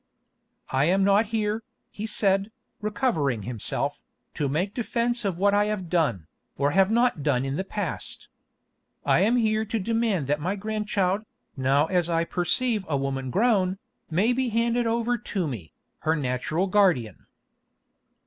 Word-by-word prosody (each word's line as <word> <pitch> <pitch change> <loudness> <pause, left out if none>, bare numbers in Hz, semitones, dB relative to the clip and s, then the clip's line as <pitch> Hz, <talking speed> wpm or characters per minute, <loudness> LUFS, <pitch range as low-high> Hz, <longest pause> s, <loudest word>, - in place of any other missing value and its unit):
"I 135 +2 +3
am 190 +4 +3
not 200 +3 +4
here," 215 0 -1 0.3
he 215 +2 -5
said, 200 -1 +1 0.3
recovering 165 - 0
himself, 115 0 -3 0.3
"to 145 - -1
make 180 +8 -1
defence 240 0 -1
of 190 -4 -1
what 200 +2 +3
I 205 0 +4
have 205 -5 -3
done, 140 - +1 0.3
or 140 +1 +2
have 190 +3 +4
not 235 -7 +2
done 135 -3 +1
in 135 0 -2
the 190 - -1
past. 195 -3 -5 0.8
I - - +4
am 215 +6 +3
here 220 -2 +2
to 225 +2 -2
demand 225 -5 0
that 145 +2 0
my 185 +5 -1
grandchild, 210 -2 -1 0.3
now 135 +2 +3
as 175 0 +1
I 165 0 +2
perceive 205 +6 0
a 140 - +1
woman 135 -1 -2
grown, 195 - +2 0.3
may 195 +9 +2
be 260 0 0
handed 235 +1 +1
over 235 +1 0
to 190 -4 -2
me, 105 - -6 0.3
her 160 +1 +1
natural 145 +5 -1
guardian." 180 - +1
195 Hz, 155 wpm, -26 LUFS, 150-220 Hz, 0.8 s, not